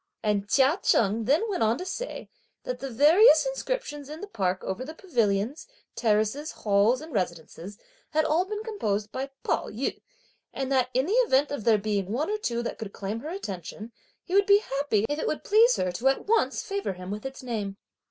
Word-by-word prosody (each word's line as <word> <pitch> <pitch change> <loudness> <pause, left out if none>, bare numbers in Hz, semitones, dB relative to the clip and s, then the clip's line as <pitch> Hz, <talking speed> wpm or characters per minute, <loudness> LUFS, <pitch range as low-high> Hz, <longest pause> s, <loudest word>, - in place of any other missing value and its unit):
And 205 -1 0
Chia 275 - +4
Cheng 220 +1 +2
then 290 - +3
went 400 -4 -2
on 225 +2 +3
to 365 - -6
say - - -5 0.4
"that 250 0 -4
the 270 +1 -5
various 310 - +6
inscriptions - - -4
in 305 +1 -7
the 410 - -6
park 190 - -2
over 205 +7 -3
the 310 +4 -8
pavilions, 230 - -1 0.3
terraces, 220 +7 +1
halls 210 +5 +2
and 315 -1 -10
residences 180 0 -4 0.3
had 310 0 +2
been - - -1
all 340 +4 +3 0.2
composed 215 - -2
by 270 +1 -4
Pao - - 0
yü, 235 +6 -3 0.5
and, 270 0 -4
that 255 -2 +2
in 260 +2 +3
the 385 - -1
event 280 -2 +3
of 285 -7 -4
there 225 -2 +5
being 200 -2 -2
one 290 - -1
or 425 - -1
two 235 - -2
that - - -5
could 210 -3 -6
claim 205 +3 -4
her 300 - -7
attention, 215 - -6 0.3
he 360 - -8
would 400 0 +4
be 400 0 +8 0.2
happy 225 -8 +1
if 295 +1 -2
it - - -2
would 310 - -2
please 455 +4 +5
her 185 - -1
to 235 +9 -1
at 270 - +1
once 450 +2 +1
favour 400 - -3
him 180 +1 -8
with 210 +1 -5
its 265 0 -7
name." 210 -5 -4
255 Hz, 205 wpm, -27 LUFS, 210-315 Hz, 0.5 s, be